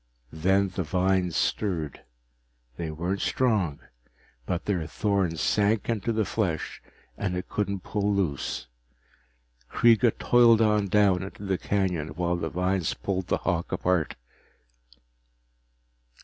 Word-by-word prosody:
Then 95 +5 +2
the 90 +1 -3
vines 90 +1 +1
stirred. 85 -9 -1 0.7
They 80 +2 -4
weren't 85 +5 -3
strong, 105 - 0 0.7
but 90 -1 -2
their 90 -6 -1
thorns 95 -3 0
sank 105 +1 +1
into 115 -1 0
the 110 -1 0
flesh 90 -9 -2 0.4
and 90 -3 -1
it 90 - -5
couldn't 100 -2 -2
pull 105 +2 -1
loose. 90 -9 -1 1.0
Kreega 115 0 +4
toiled 120 -2 +5
on 105 -2 +3
down 100 -2 +3
into 95 +2 -8
the 95 -2 -1
canyon 90 -6 -1
while 90 +1 0
the 80 -2 -3
vines 90 0 0
pulled 95 -2 -3
the - - +1
hawk 85 -3 -1
apart. 90 -3 0
95 Hz, 120 wpm, -27 LUFS, 85-105 Hz, 1.0 s, toiled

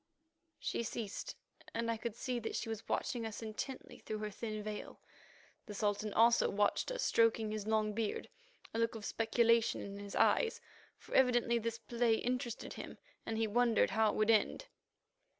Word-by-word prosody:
She - - -2
ceased, 225 -3 -4 0.4
and 230 0 0
I - - 0
could 225 0 -4
see 245 0 -2
that 225 - -4
she 225 - -2
was 225 -1 -6
watching 250 -4 -1
us 225 0 -5
intently 225 +5 -6
through 215 - -4
her 210 0 -4
thin 215 0 -5
veil. 210 0 -6 0.7
The 210 - -7
Sultan 210 0 0
also 235 +1 +5
watched 205 - +1
us, - - -2
stroking 225 -1 +3
his 215 -1 -4
long 215 -1 +1
beard, 220 -1 -2 0.5
a 225 - -1
look 230 0 +1
of 215 -2 -6
speculation 230 0 +3
in 200 0 -7
his 200 0 -7
eyes, 460 -2 +3 0.4
for - - -12
evidently 240 -2 +4
this 230 0 -2
play 230 0 +1
interested 245 0 -3
him - - -8 0.3
and 225 - -1
he 225 - +2
wondered 230 -1 +3
how 220 +1 +3
it - - -2
would 215 +1 +4
end. 220 - +2
225 Hz, 175 wpm, -35 LUFS, 215-235 Hz, 0.7 s, also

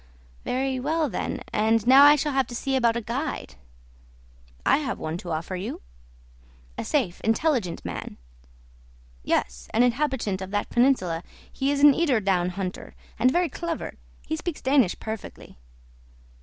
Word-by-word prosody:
"Very 260 0 -1
well, 310 +3 0
then; - - -3
and 220 0 +2
now 265 +3 +8
I 290 +1 +9
shall 295 0 -1
have 270 -1 +1
to 240 - -7
see 270 +2 -1
about 235 -3 +3
a - - -2
guide." 260 +7 -4 1.1
"I - - +5
have 295 -2 -3
one 155 +1 -4
to 180 - -8
offer 165 +3 -3
you." 185 +3 -5 1.0
"A - - -4
safe, 175 - -1
intelligent 225 - 0
man." - - -6 1.1
"Yes; - - -1
an 235 - +5
inhabitant 245 -6 0
of 190 - -5
that 205 +1 -2
peninsula. 240 -10 +2 0.3
He 270 0 -1
is 285 0 0
an 290 -1 +9
eider 280 -6 +2
down 185 -3 +1
hunter, 185 0 -6 0.2
and 250 - +5
very 350 +6 +2
clever. 335 0 -4 0.3
He - - -2
speaks 325 - -5
Danish 260 -8 +3
perfectly." 220 - -8
245 Hz, 155 wpm, -25 LUFS, 195-280 Hz, 1.1 s, I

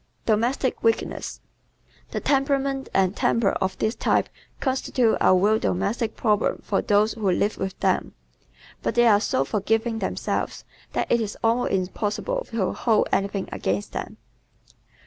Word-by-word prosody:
Domestic 235 +4 +1
Weakness 225 -1 -1 0.7
¶ - - -29
The - - -2
temperament 275 -1 0
and 190 0 +2
temper 230 -4 +2
of 190 0 -2
this 215 - 0
type - - +1 0.3
constitute 260 -3 +1
a 185 - +6
real 210 +4 +3
domestic 210 - -1
problem 210 -2 +1
for 195 - +1
those 210 +1 +2
who 215 -4 -1
live 200 +3 0
with 190 0 -4
them. - - 0 0.7
But - - -2
they 240 0 +5
are 210 -3 +5
so 135 -9 +1
forgiving 225 - 0
themselves - - -3 0.3
that - - -1
it 235 - +3
is 210 -2 -4
almost 230 +2 +2
impossible 210 - -2
to 225 -5 -1
hold 225 -3 +2
anything 195 0 0
against 100 +2 -2
them. - - -6
220 Hz, 145 wpm, -24 LUFS, 195-240 Hz, 0.7 s, a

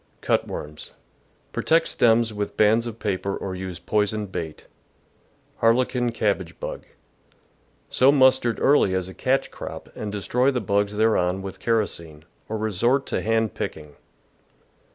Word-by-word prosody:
Cut - - +1
worms. 75 0 -7 0.3
— - - -38
Protect 165 +1 +2
stems 115 -1 +3
with 105 -1 -4
bands 110 +3 +4
of 115 -1 -6
paper 100 -2 -2
or 95 - -5
use 95 -1 -5
poisoned 105 -1 -1
bait. 80 -4 -6 0.9
Harlequin 120 +1 +2
Cabbage 100 -6 -1
Bug. - - -6 0.5
— - - -38
Sow 130 +2 +5
mustard 130 -4 +4
early 135 -9 +4
as 95 -1 -1
a 95 - -9
catch 130 +6 0
crop - - -8
and 105 -1 -5
destroy 125 +6 +1
the 130 -3 0
bugs 100 0 0
thereon 95 -4 +2
with 95 -1 -7
kerosene, 85 -9 -2 0.2
or 110 - -2
resort 115 +6 +1
to - - -2
hand 110 -1 +1
picking. 75 -2 -6
105 Hz, 145 wpm, -24 LUFS, 95-120 Hz, 0.9 s, Sow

